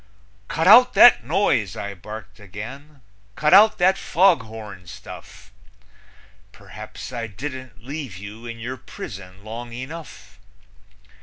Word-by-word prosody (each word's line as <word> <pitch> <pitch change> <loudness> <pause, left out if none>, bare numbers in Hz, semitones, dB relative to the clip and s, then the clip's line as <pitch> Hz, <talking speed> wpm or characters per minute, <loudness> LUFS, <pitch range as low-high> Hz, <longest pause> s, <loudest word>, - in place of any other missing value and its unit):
"Cut 165 +2 -1
out 245 +5 +8
that 240 - +8
noise!" 110 - 0
I 100 0 -5
barked 105 +1 -10
again. 130 +9 -10 0.3
"Cut 150 +3 +2
out 215 +2 +7
that 190 +2 +3
foghorn 110 - 0
stuff! 90 - -12 1.0
Perhaps - - -10
I 115 -2 -4
didn't 130 +1 -8
leave 135 - -6
you 105 +4 -10
in 115 0 -7
your 125 +3 -6
prison 95 -4 -10
long 115 +2 -7
enough. 130 - -9
120 Hz, 120 wpm, -22 LUFS, 105-150 Hz, 1.0 s, out